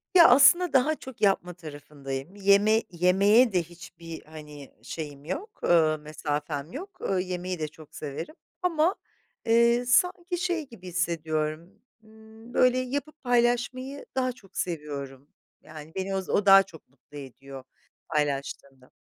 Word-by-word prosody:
Ya, 340 -2 +9
aslında 285 +8 +6
daha 275 +4 +3
çok 265 -4 -12
yapma 190 -3 +2
tarafındayım, 145 -1 -8
yeme 205 +2 +4
yemeğe 200 +7 +4
de 180 -2 +2
hiçbir, 165 -1 -11
hani, 150 -2 -12
şeyim 145 +1 -7
yok, 385 - -6
ııı, 160 -2 +4
mesafem 150 0 -4
yok, 380 +8 -9
ııı, 190 -1 0
yemeği 180 -1 -4
de 155 - -2
çok 155 0 -16
severim 150 - -6 0.3
ama, 345 0 +2 0.5
eee, 235 +1 +4
sanki 355 +7 +2
şey 350 -3 -2
gibi 185 -7 -12
hissediyorum, 165 -2 -2 0.3
ımm, 220 +2 -16
böyle, 250 0 +4
yapıp 285 +4 -4
paylaşmayı 245 +2 0
daha 255 -1 +1
çok 210 -6 -17
seviyorum. 145 -5 -5 0.3
Yani, 155 0 -11
beni 190 0 -2
oz 190 -1 -4
o 205 - +1
daha 195 0 +8
çok 170 -4 -16
mutlu 140 +2 -16
ediyor 135 0 -10 0.5
paylaştığımda. 140 -3 -3
185 Hz, 135 wpm, -27 LUFS, 155-245 Hz, 0.5 s, Ya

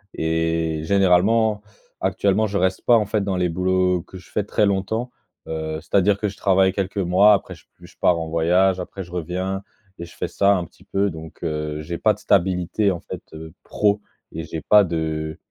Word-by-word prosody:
et 80 -1 -1
généralement 100 +4 +3 0.4
actuellement 100 +3 +1
je 100 0 -2
reste 95 0 0
pas, 120 - +6
en 105 - +1
fait 105 0 -1
dans 95 -2 -1
les 90 -1 +1
boulots 90 0 +1
que 95 +1 -12
je 95 - -15
fais 105 - 0
très 105 +1 +1
longtemps. 110 +5 -1 0.4
Heu, 80 -1 -3
c'est-à-dire 100 +1 +2
que 105 - 0
je 100 - -6
travaille 95 -1 +3
quelques 100 +1 -3
mois, 100 +3 +5
après - - -5
je - - -21
p - - -58 0.2
je - - -16
pars 85 -2 +3
en 80 - -4
voyage, 90 +3 +2
après 95 +2 -6
je 85 - -15
reviens 90 +3 -3 0.4
et 85 - -5
je - - -15
fais - - -2
ça 100 0 +2
un 85 - -3
petit - - -20
peu, 100 +1 0
donc 80 0 -11
heu, 75 -1 -3
j'ai 85 +2 -5
pas - - +3
de - - -19
stabilité 90 +3 +1
en 85 - -4
fait, - - -8
heu, 80 0 -9
pro 105 0 +1 0.3
et 80 +1 -5
j'ai 80 0 -6
pas 105 +6 +6
de, 80 -2 -3
95 Hz, 210 wpm, -22 LUFS, 80-100 Hz, 0.4 s, pas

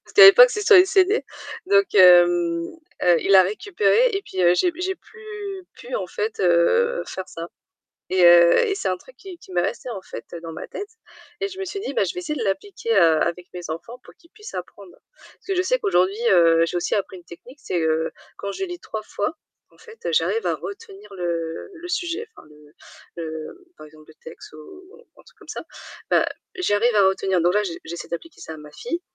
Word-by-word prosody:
parce - - -18
qu'à 415 - +8
l'époque, - - +9
c'était 420 -3 -3
sur 420 - +8
les 365 - +8
CD. 385 +3 +2 0.4
Donc, 400 0 +3
hem, 175 -2 +5 0.4
heu, 175 -1 +5
il 195 - 0
l'a 190 -1 +8
récupéré 405 - +1
et 390 - -2
puis, 190 - -6
heu, 175 -1 +5
j'ai 355 - +2
p 345 +1 -12
j'ai 380 +1 -1
plus 415 -4 -9
pu, - - -9
en - - -4
fait, 445 +1 -4
heu, - - +2
faire 190 0 -7
ça. 165 +1 -8 0.6
Et 185 -1 +2
heu, 170 0 +7
et 405 - -1
c'est 395 - -3
un 185 - -2
truc 260 +7 -19
qui 370 +3 -11
qui - - -17
m'est 175 -1 +1
resté, 255 - -4
en 205 -6 -6
fait, - - -10
heu, 170 - -7
dans 165 -1 -7
ma 160 - -8
tête 410 +2 -7 0.5
et 400 - -1
je 385 0 -11
me 385 - -3
suis 395 +2 -6
dit: 430 - -5
«Bah, 480 - +2
je - - -3
vais 360 - -4
essayer 305 -4 -4
de 230 - -3
l'appliquer, 230 - -4
heu, 165 -6 +4
avec 175 +1 -3
mes 175 -2 -7
enfants 230 +10 -7
pour - - -15
qu'ils 335 - -25
puissent 435 +1 -12
apprendre». - - -9 0.2
Parce - - -22
que 390 - -1
je 365 - +1
sais - - +1
qu'aujourd'hui, 205 - +1
heu, 165 -2 +5
j'ai 175 - -4
aussi 175 - -1
appris 195 -2 -3
une 175 - -14
technique, 240 - -14
c'est, 175 - -2
heu, 160 0 0 0.3
quand 200 0 -5
je 385 - -4
lis 355 -1 -7
3 220 - -6
fois, 215 +8 -4 0.3
en - - -26
fait, 460 0 -16
heu, - - 0
j'arrive 455 - 0
à - - +1
retenir 400 - -10
le 170 -3 -4
le 350 0 -10
sujet 360 +5 -3
enfin - - -15
le 150 0 -19 0.4
le, 160 -2 -6
hem, - - -15 0.2
par 155 - -11
exemple, 155 0 -18
le 155 - -16
texte 160 - -12
ou 155 - -13 0.3
un - - -17
truc - - -23
comme - - -18
ça. - - -6 0.5
Bah, - - +3 0.3
j'y 365 - 0
arrive 235 +3 +2
à 195 -2 +5
retenir. 190 -1 0
Donc 175 +3 +2
là, 210 - +3
j'e 180 - -4
j'essaie 170 +1 -7
d'appliquer 305 - -8
ça - - -8
à - - -10
ma 150 0 -13
fille 245 - -5
220 Hz, 235 wpm, -22 LUFS, -, 0.6 s, l'époque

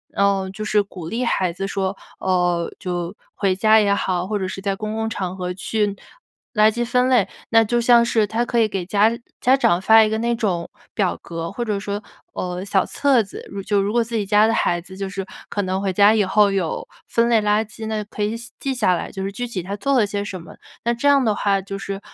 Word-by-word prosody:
嗯， 195 -1 +2
就 215 - -6
是 215 0 +2
鼓 185 -5 -8
励 240 +5 -1
孩 185 -6 +1
子 195 +3 -4
说， 195 -1 -2 0.2
呃， 180 -2 +1
就 175 -2 -3 0.2
回 195 -2 +1
家 215 +3 +5
也 200 -1 +3
好， 180 -3 -1
或 210 0 -1
者 190 - -2
是 195 - -6
在 195 -1 -1
公 215 0 -4
共 220 0 -1
场 185 -4 -4
合 180 -1 -4
去 210 +3 -1 0.7
垃 215 -1 +5
圾 240 +2 -2
分 250 +1 +2
类。 245 -7 +4 0.2
那 225 -1 +5
就 240 +2 +1
像 235 0 +6
是 225 -2 +2
他 225 +4 -1
可 240 - -2
以 220 - +3
给 195 -3 -3
家 205 +4 +3 0.3
家 260 +2 +4
长 175 -9 +2
发 220 +3 +7
一 - - -1
个 220 - -1
那 235 +1 0
种 180 -7 -1 0.2
表 195 -4 0
格， 165 0 -5
或 240 - -4
者 210 -3 -1
说， 200 +1 -4 0.3
呃， 180 0 -4
小 195 -1 +1
册 275 -4 +2
子， 195 -3 -9
如 200 - -5
就 200 +1 +1
如 200 +1 -1
果 240 +2 +2
自 230 0 -3
己 210 -2 0
家 210 +2 +4
的 225 - +1
孩 175 -5 +1
子 185 +2 -12
就 195 0 -3
是 195 0 -5 0.2
可 205 - -1
能 190 0 -1
回 195 -1 0
家 205 +3 +5
以 210 - +3
后 200 +2 +4
有 180 -5 -2 0.2
分 230 0 +2
类 230 -2 +4
垃 210 +1 +2
圾， 220 +1 -9
那 220 -1 -2
就 205 - -9
可 210 - -3
以 215 +2 -1
写 235 +1 -10
记 275 - -2
下 215 -8 +2
来， - - -5
就 195 - -6
是 195 +1 -3
具 245 +5 -3
体 230 -6 -4
他 195 +4 -5
做 275 +6 +1
了 215 - +4
些 200 0 -3
什 190 -3 -6
么。 165 - -13 0.3
那 235 - +2
这 240 +5 +1
样 280 -2 +4
的 215 -2 +2
话， 200 -1 +1
就 195 +1 -6
是， 195 0 -5
205 Hz, 270 characters per minute, -21 LUFS, 190-225 Hz, 0.7 s, 发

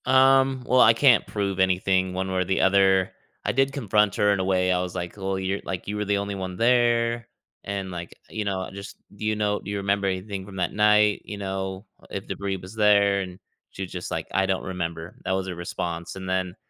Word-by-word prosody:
Um, 130 0 +4
well, 125 0 +4
I 115 - +7
can't 120 -1 +4
prove 100 -2 -2
anything 95 0 +2
one 95 +1 -2
way 95 - 0
or - - 0
the 95 - +1
other. 95 -1 +4 0.3
I - - +2
did 135 +1 +2
confront 105 -6 +2
her 105 -2 +3
in 100 - -1
a - - +1
way, 95 -1 +2
I 90 0 +2
was, 90 0 -5
like, 85 -1 -4
"Well, 95 -1 -2
you're, 95 +1 -1
like 95 -3 -5
you 105 - -3
were 105 0 -2
the 100 0 +1
only 100 0 -3
one 95 -1 -5
there,” 120 -1 +2 0.4
and, 100 -1 -4
like, 85 -1 -7
you 110 - -3
know, 95 -2 -2
just 100 0 -9 0.2
"Do 105 - -6
you 110 0 +1
know 105 -1 0
do - - -9
you 100 - -2
remember 100 0 0
anything 95 +1 -3
from 100 -1 -11
that 90 -2 -1
night?" 105 0 +4
You 105 - -6
know, 95 0 -4 0.2
"If - - -6
debris 100 -1 -3
was 95 +3 -11
there," 100 -2 +4
and 90 -1 -7 0.3
she 95 - -6
was 95 - -7
just, 90 -1 -5
like, - - -3
"I 95 - +3
don't 95 -1 0
remember." 85 -2 -5
That 95 - -1
was 95 0 -1
her 90 - -4
response, 85 0 -5
and 95 -1 -7
then 95 -1 -1
95 Hz, 235 wpm, -25 LUFS, 95-105 Hz, 0.4 s, I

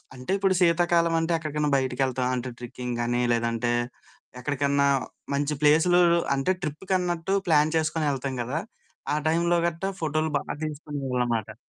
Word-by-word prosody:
అంటే, 125 +8 -6
ఇప్పుడు 195 -1 +2
శీతాకాలమంటే, 170 -1 +2
ఎక్కడికన్నా 150 -2 -2
బయటికెళ్తాం 130 -1 0
అంటే, 125 +1 -3
ట్రిక్కింగ్ 125 0 -5
గానీ, 120 +1 0
లేదంటే 115 0 0 0.7
ఎక్కడికన్నా 140 +1 +1 0.5
మంచి 145 +1 0
ప్లేసులూ 160 +4 +5 0.3
అంటే, 135 +7 +1
ట్రిప్పుకన్నట్టు 180 +3 -1
ప్లాన్ 155 0 +3
చేసుకొనెళ్తాం 145 -4 -1
గదా! 135 +7 -2 0.5
ఆ - - +2
టైంలో 170 +2 +2
గట్టా 170 +4 -3
ఫోటోలు 155 0 0
బా - - -3 0.2
తీసుకునేవాళ్ళనమాట. 125 -7 -3
150 Hz, 120 wpm, -26 LUFS, 130-165 Hz, 0.7 s, ప్లేసులూ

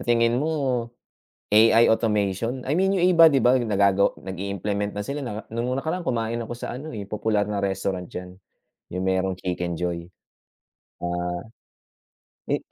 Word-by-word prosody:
tingin 115 +1 +3
mo, 135 -7 -1 0.6
AI 115 +2 +6
automation? 110 +2 +1
I 145 - +1
mean, 190 +2 +3
yung 180 -2 +3
iba, 165 - +9
hindi 140 -5 +6
ba 125 +3 +5
nagago 100 -4 +3
nag-i-implement 100 +2 -3
na 105 - -4
sila 140 +7 -4
na 110 -4 -4
noong 125 +4 -2
nakaraan 170 +4 -3
kumain 115 -3 -1
ako 115 - -6
sa 120 0 -5
ano, 150 +5 -7
eh, 100 -3 -6
popular 105 -1 0
na 100 -1 -1
restaurant 95 -1 -2
diyan. 90 0 -7 0.6
Yung 90 - -2
merong 95 0 0
Chicken 90 -1 -3
Joy. 85 0 -3 0.9
Ah, 90 0 -2 1.1
eh, - - +2
105 Hz, 150 wpm, -24 LUFS, 95-125 Hz, 1.1 s, iba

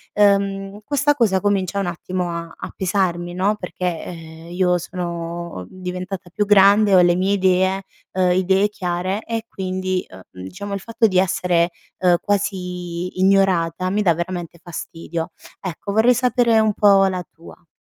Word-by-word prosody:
uhm, 200 0 +2
questa 290 +2 +1
cosa 210 -7 +2
comincia 200 -1 0
un 195 - -1
attimo 180 0 -3
a 170 -1 -5
a - - -8
pesarmi, 175 -2 -1
no, 195 +4 +1
perché, 180 -2 -4 0.2
eh, 165 0 -10
io 180 -1 +2
sono 170 - -5
diventata 180 0 -6
più 210 +4 -1
grande, 200 0 +6
ho - - +8
le 175 0 +4
mie 190 +2 +1
idee, 190 0 +2 0.3
uhm, 185 -1 +2
idee 190 +2 +3
chiare 185 +1 -3
e 230 -1 -4
quindi, 185 -1 -2
uhm, 95 0 -13
diciamo 200 - -7
il 195 - -2
fatto 230 +3 0
di 185 -2 +2
essere, 180 -2 +2 0.3
uhm, 180 -1 +4
quasi 180 -3 -3
ignorata 185 -2 +2
mi 210 +1 +1
dà 170 -5 +3
veramente 175 -1 -5
fastidio. 165 0 -5 0.3
Ecco, 190 +2 -5
vorrei 235 +3 +4
sapere 240 -2 +3
un 215 -1 +2
po' 210 - -2 0.2
la 185 -1 -1
tua. 170 +1 -16
185 Hz, 155 wpm, -21 LUFS, 175-200 Hz, 0.3 s, ho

